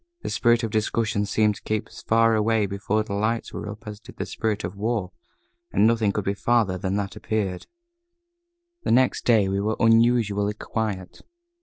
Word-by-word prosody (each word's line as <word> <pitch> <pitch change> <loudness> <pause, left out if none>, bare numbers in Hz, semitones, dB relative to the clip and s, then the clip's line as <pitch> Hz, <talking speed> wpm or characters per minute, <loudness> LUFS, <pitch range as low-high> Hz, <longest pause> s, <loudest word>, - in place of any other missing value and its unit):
The - - -3
spirit 120 0 +3
of 115 - -2
discussion 110 -1 0
seemed 105 +1 +2
to - - -15
keep 110 -1 -2
as - - -12
far 115 0 +3
away 110 0 +2
before 100 +2 -1
the 105 -2 -6
lights 110 +3 -1
were 105 - -5
up 105 +3 -9
as 105 -1 -7
did - - -14
the - - -3
spirit 110 -2 -2
of 90 +3 -5
war, 105 -2 -2 0.6
and 100 - +3
nothing 110 -2 +3
could 105 -1 -3
be 100 - +1
farther 110 -2 +1
than 95 +1 -2
that 100 -1 -3
appeared. 100 -4 -3 1.1
The - - -3
next 130 +1 +3
day 110 -5 +4
we 95 +1 -1
were 110 +2 0
unusually 115 -3 +3
quiet. 105 -4 -4
110 Hz, 185 wpm, -24 LUFS, 100-115 Hz, 1.1 s, day